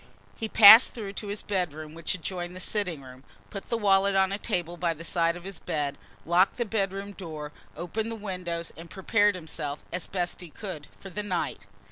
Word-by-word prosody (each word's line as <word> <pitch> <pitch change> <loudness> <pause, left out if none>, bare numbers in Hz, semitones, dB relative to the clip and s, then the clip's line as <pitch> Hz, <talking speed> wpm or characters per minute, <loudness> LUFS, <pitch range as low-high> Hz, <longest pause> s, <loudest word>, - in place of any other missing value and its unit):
He 220 -2 -4
passed 220 +3 +9
through 205 -4 -6
to 205 - -6
his 205 +1 -5
bedroom 155 -6 -3
which 165 +4 -2
adjoined 180 0 -5
the - - -7
sitting 180 -7 -2
room, 130 0 -13 0.3
put 195 - -7
the 230 - +1
wallet 200 -2 +3
on 190 0 +3
a 200 - -2
table 175 -3 -2
by 170 -1 -1
the 165 - -10
side 170 0 +1
of 175 - -12
his 195 -2 -7
bed, 145 -2 -2 0.3
locked 175 +3 +3
the 240 - 0
bedroom 195 -2 -2
door, 155 -6 -7 0.3
opened 210 +7 -3
the - - -4
windows 180 -5 -4
and 165 +1 -11
prepared 205 +1 +2
himself, 155 -4 -4
as 180 -1 -3
best 180 -1 -2
he 175 - -9
could, 175 -4 -7
for 195 - -10
the 210 - -3
night. 180 - -3
185 Hz, 200 wpm, -27 LUFS, 165-200 Hz, 0.3 s, passed